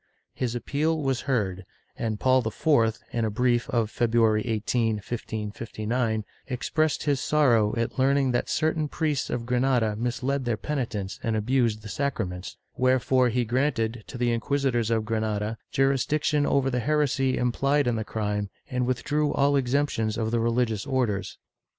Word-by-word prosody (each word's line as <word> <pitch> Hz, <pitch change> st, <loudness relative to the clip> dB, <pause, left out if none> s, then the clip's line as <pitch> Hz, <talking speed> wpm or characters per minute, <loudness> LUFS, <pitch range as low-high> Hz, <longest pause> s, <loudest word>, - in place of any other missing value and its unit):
^ -, -, -46 dB, 0.3 s
His 125 Hz, -2 st, -2 dB
appeal 155 Hz, +6 st, 0 dB
was 135 Hz, -2 st, -2 dB
heard, 95 Hz, -7 st, 0 dB, 0.3 s
and 110 Hz, -2 st, -3 dB
Paul 130 Hz, 0 st, +4 dB
IV, 115 Hz, -1 st, +2 dB
in 115 Hz, -, -1 dB
a 110 Hz, -, +1 dB
brief 120 Hz, +2 st, +1 dB
of 115 Hz, -3 st, 0 dB
February 115 Hz, -2 st, +2 dB
18, 115 Hz, 0 st, 0 dB
1559, 110 Hz, +1 st, -3 dB, 0.2 s
expressed 155 Hz, +4 st, 0 dB
his 145 Hz, -2 st, +1 dB
sorrow 120 Hz, -10 st, +3 dB
at 115 Hz, +3 st, -2 dB
learning 135 Hz, 0 st, +3 dB
that 120 Hz, -, -1 dB
certain 155 Hz, -1 st, +1 dB
priests 150 Hz, -2 st, -1 dB
of 120 Hz, -1 st, -3 dB
Granada 125 Hz, -3 st, +1 dB
misled 125 Hz, +4 st, -1 dB
their 120 Hz, -2 st, 0 dB
penitents 110 Hz, -5 st, -3 dB
and 115 Hz, -3 st, -1 dB
abused 110 Hz, -1 st, +1 dB
the -, -, -7 dB
sacraments, 100 Hz, -7 st, -3 dB, 0.2 s
wherefore 130 Hz, 0 st, +3 dB
he 120 Hz, +1 st, 0 dB
granted, 120 Hz, -2 st, 0 dB
to 125 Hz, -, -7 dB
the 120 Hz, 0 st, +1 dB
inquisitors 120 Hz, -1 st, 0 dB
of 110 Hz, -2 st, +1 dB
Granada, 110 Hz, -1 st, -1 dB, 0.2 s
jurisdiction 145 Hz, +2 st, +1 dB
over 135 Hz, -1 st, +2 dB
the 125 Hz, -, 0 dB
heresy 135 Hz, -1 st, +1 dB
implied 135 Hz, +4 st, +1 dB
in 120 Hz, -1 st, +1 dB
the 110 Hz, -, -2 dB
crime 105 Hz, -2 st, -2 dB, 0.2 s
and 125 Hz, -1 st, 0 dB
withdrew 145 Hz, +3 st, 0 dB
all 145 Hz, 0 st, +2 dB
exemptions 125 Hz, -4 st, 0 dB
of 110 Hz, -1 st, -1 dB
the 120 Hz, -, +1 dB
religious 115 Hz, 0 st, 0 dB
Orders. 110 Hz, -8 st, -1 dB
120 Hz, 155 wpm, -26 LUFS, 110-135 Hz, 0.3 s, Paul